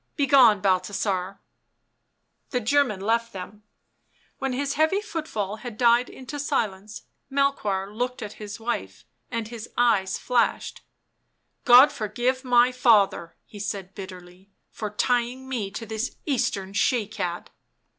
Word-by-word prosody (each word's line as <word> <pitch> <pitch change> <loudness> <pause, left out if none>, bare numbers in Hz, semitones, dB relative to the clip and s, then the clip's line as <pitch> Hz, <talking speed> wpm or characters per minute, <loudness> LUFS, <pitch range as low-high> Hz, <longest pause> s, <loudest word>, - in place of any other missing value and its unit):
" - - -48
Begone, 260 - +5
Balthasar/' 190 0 0 1.1
The 250 - 0
German 245 -4 +1
left 230 +3 0
them; 195 +2 -8 0.8
when 270 -2 -1
his 280 +2 -1
heavy 315 +6 +2
footfall 305 - -4
had 235 -1 -8
died 240 0 +4
into 265 +3 -8
silence, 215 -8 -2 0.3
Melchoir 210 -8 0
looked 250 +2 -3
at 210 0 -7
his 210 0 -7
wife 220 - -4 0.2
and 230 -1 -4
his 235 -1 -8
eyes 205 -6 +2
flashed: 245 -2 0 0.4
" - - -49 0.3
God 255 +3 +8
forgive 245 +5 -2
my 245 -1 +4
father," 210 -9 +3
he 205 - -12
said 195 -2 -5
bitterly, 185 -1 -11
" - - -50
for 215 - -5
tying 245 +4 -1
me 235 -7 -3
to 200 +4 -7
this 220 +2 -4
Eastern 200 -9 -1
she 225 +2 +2
cat 180 -5 -5
225 Hz, 135 wpm, -25 LUFS, 200-250 Hz, 1.1 s, God